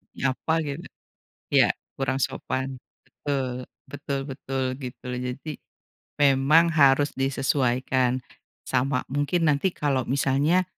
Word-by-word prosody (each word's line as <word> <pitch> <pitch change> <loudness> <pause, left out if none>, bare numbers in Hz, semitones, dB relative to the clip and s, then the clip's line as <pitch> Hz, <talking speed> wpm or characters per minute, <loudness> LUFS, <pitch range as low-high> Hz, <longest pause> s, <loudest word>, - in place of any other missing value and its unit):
Nyapa 145 +5 0
gitu. 140 -2 -5 0.7
Iya - - +6 0.3
kurang 135 0 0
sopan 130 -1 -2 0.2
betul, 130 -1 -3 0.2
betul 140 -1 -4
betul, 135 -1 -3 0.2
gitu. 125 -1 -8
Jadi, 125 +5 -4 0.7
memang 145 +5 +5
harus 145 -1 +5
disesuaikan, 130 -1 +1 0.4
sama 130 +1 0
mungkin 145 +4 +1
nanti 170 +6 +1
kalau 135 -4 0
misalnya, 140 +7 +2
135 Hz, 100 wpm, -25 LUFS, 130-145 Hz, 0.7 s, Iya